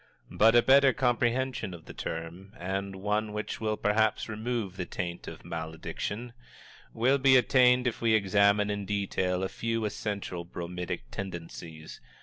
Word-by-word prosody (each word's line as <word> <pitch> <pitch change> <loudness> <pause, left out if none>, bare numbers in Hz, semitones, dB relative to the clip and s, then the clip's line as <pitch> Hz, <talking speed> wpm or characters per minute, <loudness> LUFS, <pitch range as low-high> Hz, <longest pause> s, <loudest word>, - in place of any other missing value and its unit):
But 115 +2 +5
a 120 - +7
better 135 0 +6
comprehension 120 -4 0
of 80 - -14
the - - -10
term, 85 +5 -6
and 95 +2 -3
one 105 +2 -1
which 105 +1 -4
will 110 -1 0
perhaps 110 +1 +1
remove 110 -3 -3
the 90 - -4
taint 85 -1 -5
of - - -9
malediction, 85 +8 -5 0.6
will 130 +5 +2
be 130 0 +6
attained 125 0 +4
if 120 - -1
we 115 -1 +4
examine 100 0 +3
in 100 -1 -4
detail 95 -2 -1
a - - +1
few 115 +2 -2
essential 100 -4 -4
bromidic 90 -3 -5
tendencies. 85 -4 -7
105 Hz, 145 wpm, -29 LUFS, 90-115 Hz, 0.6 s, a